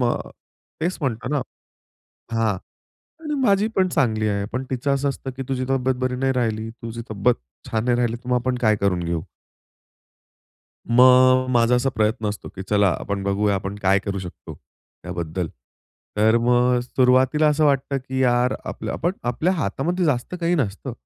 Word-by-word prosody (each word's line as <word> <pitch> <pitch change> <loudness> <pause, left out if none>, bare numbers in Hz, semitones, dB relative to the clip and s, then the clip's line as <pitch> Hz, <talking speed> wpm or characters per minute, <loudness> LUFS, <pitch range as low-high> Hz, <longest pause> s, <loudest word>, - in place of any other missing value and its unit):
मग 120 -1 0 0.5
तेच 175 +3 -1
म्हणतो 125 -4 -2
ना 145 0 0 0.9
हां, 115 -2 +2 0.7
आणि 300 -1 -3
माझी 205 -4 +3
पण 185 -1 +3
चांगली 110 -9 +1
आहे. 100 -1 -1
पण 130 +1 -1
तिचं 135 +2 0
असं 140 +1 0
असतं 135 -1 -5
की 135 - -3
तुझी 130 -1 -1
तब्येत 130 -1 +1
बरी 130 0 0
नाही 135 +1 +1
राहिली, 110 -3 -1
तुझी 115 0 -7
तब्येत 110 +3 +1 0.3
छान 110 0 0
नाही 120 -1 +2
राहिली 120 -1 0
तुम्हा 125 0 +1
आपण 125 +1 -1
काय 110 -2 +4
करून 100 -3 +1
घेऊ? 85 -1 -2 1.7
मग, 130 +1 +6
माझा 120 0 +3
असा 125 +2 +1
प्रयत्न 110 +1 0
असतो 105 0 -6
की 95 - -6
चला 105 -1 +4
आपण 100 -1 -3
बघूया 100 +1 +1
आपण 100 +1 -3
काय 95 +1 +4
करू 100 0 -4
शकतो 90 -2 -9
त्याबद्दल. 85 -1 -7 0.7
तर 110 +2 +4
मग 125 +1 +3
सुरुवातीला 130 +4 +3
असं 150 +1 +2
वाटतं 140 -1 +1
की 130 0 -4
"यार, 125 0 +2
आपल्य - - -5
आपण 175 +3 -1
आपल्या 140 +9 +1
हातामध्ये 170 - -1
जास्त 145 +2 0
काही 170 +1 +2
नसतं." 130 - -2
125 Hz, 165 wpm, -22 LUFS, 105-135 Hz, 1.7 s, मग